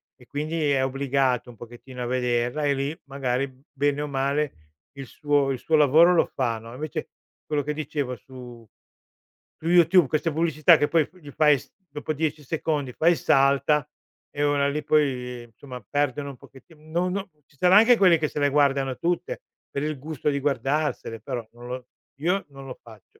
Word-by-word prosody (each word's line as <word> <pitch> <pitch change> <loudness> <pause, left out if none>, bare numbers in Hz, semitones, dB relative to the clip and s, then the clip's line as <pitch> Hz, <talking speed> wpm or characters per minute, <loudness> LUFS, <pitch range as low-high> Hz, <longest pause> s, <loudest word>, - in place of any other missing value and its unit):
e 125 - -19
quindi, 155 +1 -2
è 130 -1 +2
obbligato 135 -2 0
un 120 - -12
pochettino 120 +2 -9
a - - -3
vederla 125 +3 0
e 140 - +3
lì, 140 +4 -3
magari, 135 -1 -2 0.2
bene 145 +1 0
o 150 - -3
male, 140 +2 -1 0.4
il 135 -2 -7
suo 145 -2 0
il 130 - -2
suo 160 - +1
lavoro 155 +5 +6
lo 170 - +4
fa, 120 -4 -2
no, 115 +1 -11
invece, 150 +2 -5 0.4
quello 150 -2 -1
che 150 +1 -2
dicevo 145 -4 -3
su 120 -1 -12 0.9
su 165 - -5
YouTube, 175 -1 +6
queste 155 +2 0
pubblicità 160 +1 +4
che 145 - +1
poi 160 -3 +2
p 185 - -23
gli 145 -4 -11
fai 150 -1 +4
s - - -17 0.2
dopo 150 +2 -4
10 155 0 -2
secondi, 145 -3 -2
fai 170 +2 +3
salta 140 0 +2 0.4
e 145 - -2
ora 145 -1 +2
lì, 150 +1 -3
poi, 125 -5 0
somma, 125 -3 -10
perdono 145 -1 -1
un 130 - -14
pochetti 135 +7 -17
no 165 +4 -2
no 195 +1 -4 0.2
ci 140 - -28
sarà 180 +5 +5
anche 230 +2 +6
quelli 180 -5 +5
che 155 - 0
se - - -10
le 145 0 +3
guardano 140 -2 +2
tutte, 175 - -2 0.3
per 140 - -3
il 155 -1 -2
gusto 150 0 -3
di 140 -1 0
guardarsele, 140 -3 -1
però 120 -2 -5
non 120 +1 -13
lo 125 0 -6 0.3
io 180 +6 0
non 135 -1 -12
lo 130 - -8
faccio. 110 -2 -17
145 Hz, 190 wpm, -25 LUFS, 130-155 Hz, 0.9 s, lavoro